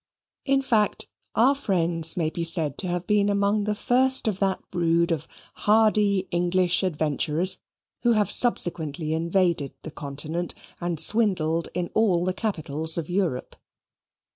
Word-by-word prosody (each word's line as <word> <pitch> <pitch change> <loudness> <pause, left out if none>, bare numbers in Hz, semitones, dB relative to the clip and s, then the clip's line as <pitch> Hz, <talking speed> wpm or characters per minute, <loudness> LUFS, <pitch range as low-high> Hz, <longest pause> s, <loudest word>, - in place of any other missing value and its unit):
In 275 -1 +1
fact, 220 -6 +1 0.3
our 250 +5 +4
friends 170 - 0
may 160 -3 -1
be 170 - -4
said 165 -4 +3
to 185 - +1
have 175 0 -3
been 205 0 +2
among 200 +1 0
the 210 0 -1
first 260 +3 +1
of 200 -3 -1
that 195 -1 0
brood 170 -1 +1
of 160 -4 -3 0.3
hardy 210 -2 +2
English 175 0 +1
adventurers 160 0 0 0.4
who 240 -1 +3
have 210 -3 +1
subsequently 160 - +1
invaded 170 -3 0
the 160 - -8
Continent 150 +5 -5 0.2
and 175 -2 -3
swindled 170 -8 +2
in 175 -1 -3
all 185 -6 +2
the 185 - -1
capitals 160 -6 0
of 170 0 -4
Europe. 175 -9 -2
180 Hz, 140 wpm, -24 LUFS, 165-210 Hz, 0.4 s, our